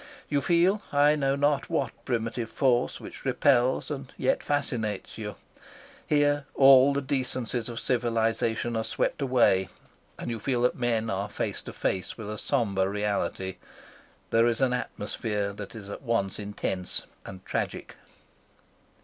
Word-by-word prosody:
You 145 -1 +1
feel 180 +5 +3
I 145 +1 +5
know 135 -2 +1
not 145 0 +1
what - - 0
primitive 115 -1 -2
force 125 0 +1
which - - -10
repels 130 0 +2
and 135 -3 -5
yet 130 - +1
fascinates 115 -9 -2
you. 105 -2 -5 0.7
Here 145 -1 +2
all 135 0 +8
the 140 0 -1
decencies 130 -4 -1
of 120 -1 -4
civilisation 115 -1 0
are 110 - 0
swept - - -1
away, 120 -8 +3 0.5
and - - -4
you 115 - -3
feel 125 0 0
that 125 - +3
men 115 -2 0
are 100 +2 -2
face - - -3
to - - -8
face 95 - -2
with 105 -2 -6
a 105 - -5
sombre 95 -4 +1
reality. 100 -2 -2 0.7
There 115 +1 +5
is 115 -1 +1
an 130 -2 +2
atmosphere 105 -3 -2
that 105 +2 -8
is 105 -3 -8
at 100 - -7
once 115 -7 -1
intense 100 -3 -3 0.2
and 95 -1 -10
tragic. - - -3
120 Hz, 150 wpm, -27 LUFS, 105-135 Hz, 0.7 s, all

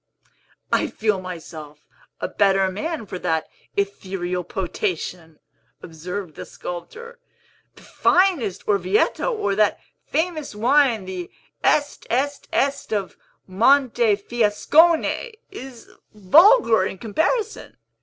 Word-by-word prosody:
"I - - +2
feel 215 -3 -1
myself 160 -4 -9 0.3
a - - -2
better 195 -1 +2
man 305 - -4
for 185 - -7
that 160 -2 -1 0.3
ethereal 190 -2 -2
potation," 175 -2 -4 0.5
observed 180 +2 -6
the - - -8
sculptor. 470 - -8 0.6
"The - - -17
finest 335 - +1
Orvieto, 200 - +1
or 315 - -1
that 210 0 +2 0.3
famous 315 -7 -2
wine, 240 -2 +3
the 185 -2 -6 0.3
Est 290 -1 +1
Est 280 +4 -1
Est 280 0 -1
of 200 -4 -2 0.3
Montefiascone, 240 - +2 0.2
is 265 - -10 0.3
vulgar 230 - +5
in - - -7
comparison. 320 - -2
210 Hz, 100 wpm, -22 LUFS, 185-285 Hz, 0.6 s, vulgar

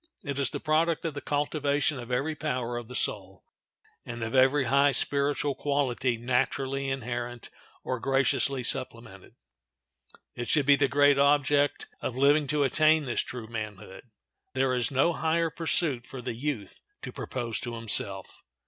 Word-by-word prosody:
It 140 -1 -4
is 135 -4 +2
the - - -5
product 160 +2 +1
of 160 - -2
the 145 - -6
cultivation 145 -1 0
of 120 0 -8
every 135 +6 0
power 125 -6 -3
of 120 -1 -5
the 125 - -9
soul, 95 -5 -3 0.6
and 120 -1 -6
of 110 - -4
every 135 +2 +4
high 140 +3 +3
spiritual 140 +2 +2
quality 130 -3 -1
naturally 135 +3 -1
inherent 120 -2 -5 0.3
or 130 -1 -3
graciously 135 0 +1
supplemented. - - -3 1.0
It 120 -2 -6
should 150 -3 +2
be 145 0 +6
the 140 0 +2
great 145 0 +4
object 145 0 +2 0.2
of 120 - -3
living 145 +2 +4
to 150 0 +1
attain 155 +3 +3
this 120 - 0
true 125 -3 -7
manhood. 105 -4 -7 0.5
There 130 0 +1
is 125 -2 +1
no 140 +6 +2
higher 165 0 0
pursuit 155 -6 -1
for 135 - -8
the 120 - -4
youth 120 -4 -5 0.2
to - - -6
propose 120 -3 -4
to 120 -1 -5
himself. 100 -4 -1
135 Hz, 155 wpm, -28 LUFS, 120-145 Hz, 1.0 s, be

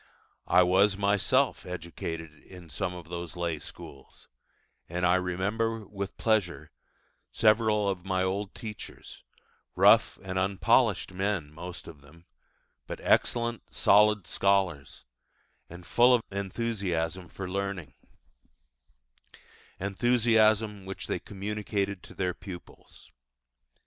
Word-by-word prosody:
I 90 - +6
was 95 +2 +3
myself 100 +7 +2
educated 85 -2 -6
in 90 -4 -13
some 95 -2 -3
of 85 -2 -10
those 85 0 -6
lay 85 -3 -2
schools; 70 -1 -12 0.6
and 90 +2 -1
I 90 - +4
remember 100 +5 -1
with 100 -1 -6
pleasure 90 -9 0 0.6
several 110 -1 +3
of 95 -3 -2
my 95 -1 0
old 95 +1 -2
teachers: 110 -2 -9 0.5
rough - - +5
and 95 0 -2
unpolished 95 -1 +2
men 95 -6 -2
most 85 +2 -8
of 75 -4 -11
them, 80 +4 -19 0.6
but - - -6
excellent, 120 -1 +1
solid 105 -1 +4
scholars, 95 -8 0 0.6
and 85 +1 -11
full 125 +6 +5
of 115 - -1
enthusiasm 95 -4 -2
for 95 - -6
learning 95 -5 -4 1.9
enthusiasm 110 0 +2
which 95 +1 -6
they - - -2
communicated 100 -1 -3
to - - -14
their 90 -1 -1
pupils. 90 -3 -12
95 Hz, 110 wpm, -28 LUFS, 90-105 Hz, 1.9 s, I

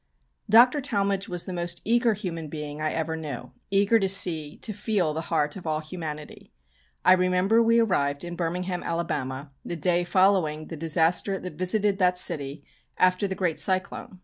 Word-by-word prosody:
Dr. 245 +6 +6
Talmage 200 -6 -1
was 175 -1 -2
the 185 - -6
most 175 0 -3
eager 235 0 +2
human 170 -6 -5
being 150 0 -6
I 155 0 0
ever 160 0 -2
knew, 150 -6 -7 0.2
eager 200 +3 +3
to 195 -2 0
see, 165 -6 +2
to 215 - -4
feel 200 -6 -1
the 160 - -3
heart 150 -3 0
of 180 -4 -8
all 155 -1 0
humanity. 155 -2 -8 0.5
I 185 - +8
remember 185 +4 +3
we 230 0 +3
arrived 145 -10 +1
in 175 0 -6
Birmingham, 180 +1 -3
Alabama, 140 -5 -3
the 175 - -5
day 175 +2 +1
following 175 -4 +2
the 165 - -5
disaster 165 +5 +1
that 180 -2 -7
visited 195 +4 +1
that 180 -1 +3
city 145 -5 0 0.3
after 185 +2 +2
the 190 - -4
great 180 -4 -1
cyclone. 185 0 -2
180 Hz, 175 wpm, -26 LUFS, 155-195 Hz, 0.5 s, I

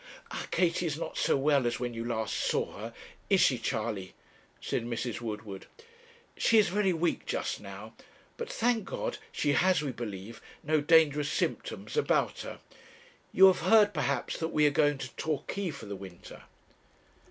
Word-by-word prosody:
'Our - - -5
Katie 175 -1 +1
is 150 -2 -2
not - - -5
so - - +2
well 140 -2 +3
as 120 - -1
when 120 -1 -3
you 115 0 -4
last 115 -2 -2
saw - - 0
her 115 +3 -7 0.4
is 195 -2 +5
she, 130 -7 +4
Charley?' 110 -4 -3 0.4
said - - -2
Mrs. 120 0 -3
Woodward. 105 -3 -6 0.7
'She 225 - +3
is 210 -4 +5
very 195 +1 +2
weak 170 0 -1
just - - -2
now; - - -9 0.4
but 470 - -5
thank 230 -2 +1
God - - -4
she 145 - 0
has, 185 0 +3
we 140 - -2
believe, 110 -2 -7 0.2
no 155 0 +2
dangerous 150 -2 +4
symptoms - - -3
about 450 - +1
her. - - -7 0.7
You 190 - +7
have 190 -1 +6
heard, 210 -2 +5
perhaps, 140 -4 -1
that 160 - -1
we 150 -2 +2
are 145 - +5
going 145 0 +3
to 130 -3 -7
Torquay 160 +5 -2
for 140 -7 -8
the 100 -1 -5
winter?' 95 -3 -11
145 Hz, 170 wpm, -30 LUFS, 115-175 Hz, 0.7 s, You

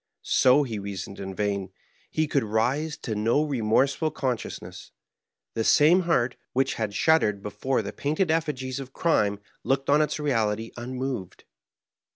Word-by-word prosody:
So 130 +3 +4
he 115 -6 -4
reasoned 100 -1 -6
in 95 -1 -6
vain; 100 -1 -1 0.4
he 155 0 0
could 140 -2 +1
rise 125 +9 0
to 110 - -2
no 115 +8 +2
remorseful 135 +3 +1
con 135 -4 -1
sciousness; - - -9 0.6
the 115 - -1
same 155 +9 +5
heart, 125 -6 +2 0.2
which 135 +1 +1
had 105 -2 -3
shuddered 105 -11 +2
before 120 +4 -1
the 100 - -6
painted 155 +4 0
effigies 140 -5 -1
of 135 -1 -8
crime, 105 -12 +1 0.3
looked 135 +2 0
on 150 +1 +5
its 150 - -1
reality 115 -6 0
un 125 +2 -6
moved. 125 -8 -4
130 Hz, 155 wpm, -26 LUFS, 105-145 Hz, 0.6 s, same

